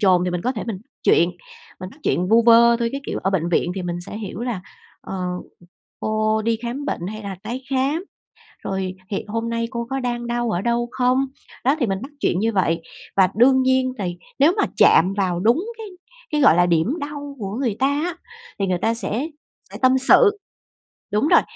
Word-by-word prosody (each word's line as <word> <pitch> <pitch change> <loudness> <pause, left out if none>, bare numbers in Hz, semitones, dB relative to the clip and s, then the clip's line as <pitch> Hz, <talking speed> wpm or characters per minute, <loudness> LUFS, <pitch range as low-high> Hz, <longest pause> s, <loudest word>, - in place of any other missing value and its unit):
chồn. 185 -3 +4
Thì 180 - -1
mình 175 -1 -3
có 250 - 0
thể 220 - -5
mình 210 -5 -3 0.2
chuyện 170 +1 +4 0.5
mình 185 +1 -6
bắt 290 - -17
chuyện 180 - 0
vu 225 +2 +5
vơ 235 0 +7
thôi, 235 -1 0
cái 275 - -3
kiểu - - -3
ở 195 - +1
bệnh 170 -3 0
viện 175 +1 +1
thì 190 - -4
mình 175 0 -3
sẽ 200 - -7
hiểu 205 0 -6
là, 240 -6 -3 0.4
ờ, - - -7
ừm, 180 -1 -4 0.5
"Cô 215 0 0
đi 230 +1 +1
khám 245 +5 -4
bệnh 175 - -3
hay 215 +2 -6
là 195 -2 -5
tái 255 +2 -5
khám? 275 +7 0 0.6
Rồi 190 -1 -2 0.2
hiện 205 +1 -3
hôm 230 +2 -2
nay 230 0 -1
cô 235 -2 -4
có 270 0 -1
đang 240 -1 -3
đau 240 -1 -1
ở 175 - 0
đâu 235 +1 0
không?" 255 +2 +2 0.4
Đó, 270 +3 +4
thì 245 - +2
mình 195 -1 -1
bắt 275 +3 -8
chuyện 175 - +1
như 225 +3 +1
vậy. 165 -4 +1 0.3
Và 190 -2 +5
đương 260 +3 +5
nhiên 260 0 +2
thì 180 -4 -3 0.2
nếu 290 +5 +5
mà 410 - +3
chạm 185 +4 +5
vào 185 -3 0
đúng 235 - +3
cái 445 - -7 0.5
cái, 300 - +1
gọi 170 - +6
là, 175 0 +4
điểm 170 - +2
đau 285 -1 -6
của 200 -2 -4
người 235 -7 0
ta 265 - +3
á, 305 +5 -1 0.4
thì 200 - 0
người 185 -1 0
ta 225 +5 +1
sẽ 235 +4 -2 0.5
sẽ - - -7
tâm 255 +1 +5
sự. 415 - +5 0.7
Đúng 210 +7 +2
rồi. - - +6
230 Hz, 220 wpm, -22 LUFS, 190-260 Hz, 0.7 s, vơ